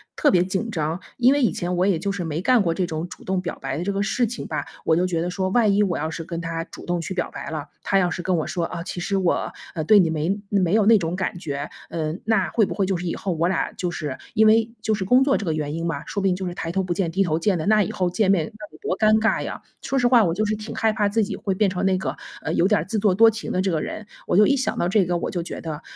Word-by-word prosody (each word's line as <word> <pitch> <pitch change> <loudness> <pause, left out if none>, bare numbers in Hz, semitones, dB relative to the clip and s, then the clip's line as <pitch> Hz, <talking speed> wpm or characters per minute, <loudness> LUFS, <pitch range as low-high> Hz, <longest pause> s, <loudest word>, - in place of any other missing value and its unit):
特 295 - +3
别 180 -2 +4
紧 190 +5 -2
张。 160 -1 -2 0.2
因 250 +2 +5
为 290 - +1
以 230 - +3
前 175 +1 -2
我 180 +1 +2
也 195 -4 +2
就 200 +4 -1
是 195 -3 -3
没 160 0 -3
干 250 +3 +4
过 170 -4 +1
这 180 +2 -1
种 160 +1 -4
主 - - -11
动 190 -1 0
表 175 - -5
白 - - -3
的 170 - -2
这 200 - -1
个 200 0 -1
事 230 +4 +1
情 235 +2 -5
吧， - - -2 0.2
我 160 - +4
就 175 +2 +2
觉 170 -3 -1
得 175 - -1
说， 185 +1 -1
万 210 -1 +3
一 205 - +4
我 185 -4 0
要 155 +2 -2
是 165 +1 -5
跟 170 0 -5
他 165 -1 -3
主 - - -12
动 175 -1 -1
去 165 +3 -4
表 175 -2 -2
白 - - -6
了， 155 -2 -5 0.2
他 195 - +2
要 180 -2 +2
是 175 - -4
跟 180 0 0
我 155 - -2
说： 175 - -2
"啊， 170 - -5
其 175 - -5
实 195 +2 0
我， 185 -3 0 0.2
呃， 160 - -1
对 210 +6 +6
你 175 -4 +3
没 160 +6 -1
没 185 -3 +2
有 215 -1 +4
那 225 +1 +7
种 170 -2 -2
感 185 -1 -2
觉。” 145 -4 -4 0.2
嗯， 160 +2 -3
那 215 -4 +2
会 220 - +3
不 - - -4
会 195 -2 0
就 190 - 0
是 180 +1 -4
以 165 - -2
后 190 - -2
我 170 +2 +1
俩 190 - -1
就 180 -1 -3
是 150 -6 -4 0.2
因 220 +1 +5
为 225 +1 +4
就 220 0 0
是 200 - -3
工 250 +7 +5
作 275 0 +3
这 205 - -4
个 160 - 0
原 150 -1 -3
因 165 +1 -3
吧， 160 -3 -3
说 200 - -3
不 195 - +2
定 185 - +3
就 185 0 -4
是 175 - -4
抬 165 - -4
头 190 +2 0
不 180 -1 -1
见 175 -2 -1
低 195 +3 +2
头 155 -2 0
见 190 +2 +1
的， 155 - -3
那 215 0 +4
以 - - -4
后 180 -1 0
见 190 +2 +2
面 175 -6 +2
那 215 +1 -11
得 - - -15
多 185 - -2
尴 215 0 +4
尬 220 0 +1
呀。 - - -6 0.2
说 270 - -1
实 245 - +3
话 240 -2 +6
我 170 -4 +1
就 215 +5 0
是 215 +1 0
挺 215 +1 -7
害 220 -1 +2
怕 205 -1 +1
自 220 +2 +2
己 200 - -4
会 195 - -2
变 205 +1 +2
成 185 +1 -2
那 190 -1 +3
个， 190 - -3 0.3
呃， - - -3
有 175 - +3
点 205 -7 +2
自 215 +2 -1
作 200 -2 +3
多 225 +3 +7
情 225 0 -5
的 185 - +1
这 190 - 0
个 160 -2 0
人， 215 +5 -6 0.2
我 - - +2
就 210 - +7
一 280 - +3
想 260 - -1
到 175 - +1
这 195 -1 +3
个， 175 0 0
我 - - -3
就 175 -2 -2
觉 - - -7
得， 155 -1 -5
185 Hz, 350 characters per minute, -23 LUFS, 170-210 Hz, 0.3 s, 那